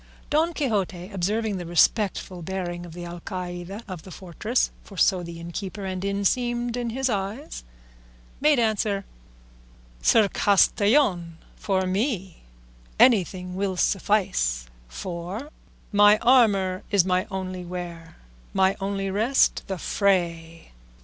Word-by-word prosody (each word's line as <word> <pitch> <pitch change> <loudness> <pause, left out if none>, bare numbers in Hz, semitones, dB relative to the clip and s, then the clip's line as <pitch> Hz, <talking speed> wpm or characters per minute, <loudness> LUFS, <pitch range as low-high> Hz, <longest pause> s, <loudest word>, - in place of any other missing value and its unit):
Don 315 +3 +3
Quixote, 200 - -2
observing 205 +3 -1
the 175 - -5
respectful 185 +1 +1
bearing 175 -1 -4
of 165 - -11
the 175 0 -7
Alcaide 175 +3 -6
of 185 -5 -7
the 190 - -13
fortress 190 +7 -2
(for 195 - -13
so 185 0 +3
innkeeper 170 +4 -6
and 185 -1 -4
inn 200 0 -1
seemed 240 +1 0
in 240 -1 -2
his 265 +3 -1
eyes), 210 - -4 0.8
made 295 0 +4
answer, 215 -3 0 1.0
"Sir 220 - +5
Castellan, 200 - +3 0.2
for 190 -2 -1
me 190 - -2 0.6
anything 185 -6 +3
will 190 -1 -1
suffice, 170 - +1 0.2
for 180 - -6 0.4
'My 205 0 +6
armour 205 -7 +4
is 195 -4 +3
my 185 0 +1
only 185 -2 -4
wear, 175 -2 -7 0.4
My 190 0 +3
only 195 0 -2
rest 225 +7 +2
the 190 -1 -3
fray. 170 -3 -1
190 Hz, 120 wpm, -25 LUFS, 175-215 Hz, 1.0 s, My